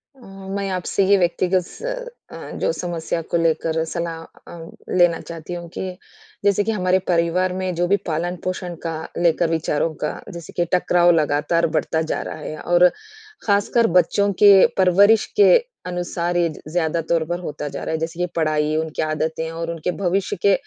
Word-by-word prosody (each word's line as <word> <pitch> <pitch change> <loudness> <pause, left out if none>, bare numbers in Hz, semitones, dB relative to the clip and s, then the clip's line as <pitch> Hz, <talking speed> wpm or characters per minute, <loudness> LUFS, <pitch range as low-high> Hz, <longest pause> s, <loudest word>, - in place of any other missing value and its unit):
अ, - - -22 0.4
मैं 200 -1 -2
आपसे 185 +2 0
ये 200 - +6
व्यक्तिगत 180 +1 +1
स 450 - -13 0.5
अ - - -9
जो - - +2
समस्या 170 - -3
को - - +3
लेकर 165 -1 +1
सलाह 170 -1 -4
अ, 165 0 -12 0.3
लेना 175 -2 +4
चाहती 165 +1 -8
हूँ 175 -1 -6
कि, 185 -1 -5 0.5
जैसे 200 0 +3
कि 225 - -1
हमारे 185 -3 +2
परिवार 180 +1 +1
में 185 0 -2
जो 175 +1 0
भी 200 +3 +3
पालन-पोषण 175 +2 -3
का 165 -1 -2 0.2
लेकर 170 -1 +2
विचारों 160 -1 0
का, - - 0 0.2
जैसे 170 -2 -9
कि 175 - +2
टकराव 175 -1 +4
लगातार 155 +1 +1
बढ़ता 160 0 0
जा - - -1
रहा - - -6
है 155 0 -6
और 175 +1 +4 0.6
खासकर 210 +3 +2
बच्चों 200 +4 +3
के 200 -2 +9
परवरिश 200 +4 +5
के 410 - +8 0.3
अनुसार 175 -1 -2
ये 170 -1 +2
ज 155 - -10
ज़्यादा 165 -1 0
तौर 165 0 0
पर 175 +2 -3
होता 150 -4 -5
जा - - -6
रहा - - -3
है, - - 0
जैसे 165 +1 -4
कि 180 - +1
पढ़ाई, 155 -2 +1
उनकी 160 -1 -2
आदतें 160 +1 -2
और 165 0 -4
उनके 165 +1 -3
भविष्य 185 +1 0
के 200 - +6
175 Hz, 180 wpm, -21 LUFS, 165-185 Hz, 0.6 s, के